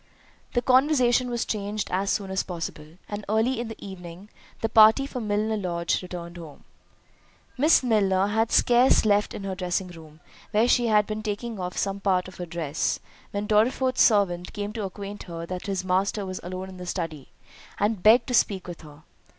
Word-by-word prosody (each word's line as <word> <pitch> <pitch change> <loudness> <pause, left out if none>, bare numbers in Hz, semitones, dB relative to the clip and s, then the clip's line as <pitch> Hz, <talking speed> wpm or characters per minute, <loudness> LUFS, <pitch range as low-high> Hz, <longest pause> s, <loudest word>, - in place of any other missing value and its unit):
The 245 - +1
conversation 255 -2 +3
was 240 -1 -2
changed 210 0 -3
as 195 +2 0
soon 195 -2 -1
as 190 - 0
possible, 165 -2 -7
and 205 0 -5
early 225 +4 +1
in 235 - -3
the 225 - -7
evening 185 0 -10 0.3
the 225 - +1
party 220 +4 +6
from 250 -5 -5
Milner 210 +1 0
Lodge 170 -4 -1
returned 175 -1 -8
home. 160 -4 -11 0.9
Miss 295 +2 +4
Milner 195 -5 +2
had 220 +2 0
scarce 245 0 +4
left 205 0 +2
her 195 -1 -4
dressing 185 0 -2
room, 160 -3 -13 0.3
where 220 +2 +2
she 245 -1 +3
had 210 -2 +4
been 215 +1 -4
taking 215 +1 -4
off 180 0 -5
some 195 0 -1
part 185 -2 +1
of 185 - -12
her 175 - -6
dress, 160 -3 -2 0.3
when 205 +1 -3
Dorriforth's 250 +5 +2
servant 185 -5 +3
came 205 -1 -4
to 215 -3 -3
acquaint 200 +1 -7
her 165 0 -5
that 180 +2 -6
his 190 -2 -2
master 195 +2 0
was 185 -1 -5
alone 185 +1 -6
in 185 -1 -11
his 180 -1 -6
study, 160 -6 -4 0.5
and 205 -1 0
begged 230 +4 +6
to 255 - -4
speak 195 -6 +1
with 175 -2 -8
her. 150 0 -14
200 Hz, 185 wpm, -25 LUFS, 180-220 Hz, 0.9 s, party